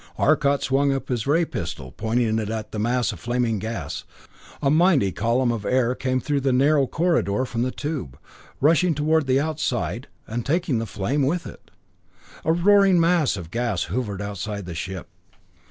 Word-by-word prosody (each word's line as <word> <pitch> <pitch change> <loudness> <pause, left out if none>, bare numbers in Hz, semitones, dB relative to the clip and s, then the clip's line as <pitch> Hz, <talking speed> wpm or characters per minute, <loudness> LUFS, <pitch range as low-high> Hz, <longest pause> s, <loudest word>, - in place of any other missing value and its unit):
Arcot 145 -2 +2
swung 140 +1 +2
up 135 -1 -3
his 120 -3 -2
ray 165 +4 +3
pistol, 80 - -6
pointing 110 - 0
it 105 -1 -3
at 110 -1 -4
the 105 - -4
mass 120 +3 +1
of 100 - -9
flaming 120 +1 0
gas. 105 -8 -5 0.6
A 140 -2 +1
mighty 155 - +4
column 120 +5 +1
of 115 -3 -3
air 125 0 +2
came 130 0 -1
through 145 +2 -1
the 135 0 +1
narrow 140 +2 +3
corridor 150 - +1
from 120 -2 -3
the 125 - +1
tube, 145 - -5 0.4
rushing 165 +3 +3
toward 155 0 +1
the 130 +1 +3
outside, 125 - -2 0.2
and 115 +2 -4
taking 155 -4 0
the 115 - -3
flame 105 +9 -1
with 165 +6 0
it. - - -12 0.7
A 160 - +2
roaring 195 +1 +5
mass 165 - +2
of 85 -3 -8
gas 115 -5 -1
hovered 105 -5 -2
outside 100 +1 -4
of - - -10
the 85 - -6
ship. 95 +1 -5
125 Hz, 180 wpm, -23 LUFS, 110-150 Hz, 0.7 s, roaring